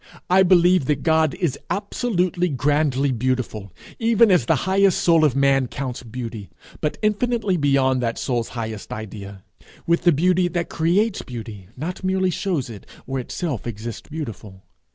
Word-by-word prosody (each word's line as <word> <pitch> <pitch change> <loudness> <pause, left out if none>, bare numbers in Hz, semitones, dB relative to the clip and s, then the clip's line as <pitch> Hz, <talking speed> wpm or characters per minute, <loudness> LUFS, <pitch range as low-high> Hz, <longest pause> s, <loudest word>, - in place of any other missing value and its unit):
I 190 +1 +6
believe 180 -3 +4
that 140 0 -1
God 160 -2 +2
is 170 -8 -2
absolutely, 185 -4 -1
grandly 145 -1 +1
beautiful, 120 -5 -2 0.3
even 230 -1 +4
as 170 -11 +3
the - - +4
highest 190 0 +3
soul 165 -2 +4
of 145 -5 +3
man 135 -1 +3
counts 130 -1 -5
beauty, 115 -4 -7 0.3
but 150 - -2
infinitely 215 -1 +1
beyond 135 -4 +2
that 115 -1 -1
soul's 120 -3 -2
highest 110 -2 -5
idea 100 -2 -8 0.4
with 170 0 +2
the 175 0 +5
beauty 180 +4 +2
that 175 -1 -3
creates 190 +6 +1
beauty, 110 -6 -8
not 175 +8 -5
merely 185 0 +1
shows 175 -7 -2
it, 110 -4 -11 0.2
or 135 0 -3
itself 130 - -4
exists 115 0 -7
beautiful. 110 - -7
145 Hz, 155 wpm, -22 LUFS, 120-180 Hz, 0.4 s, I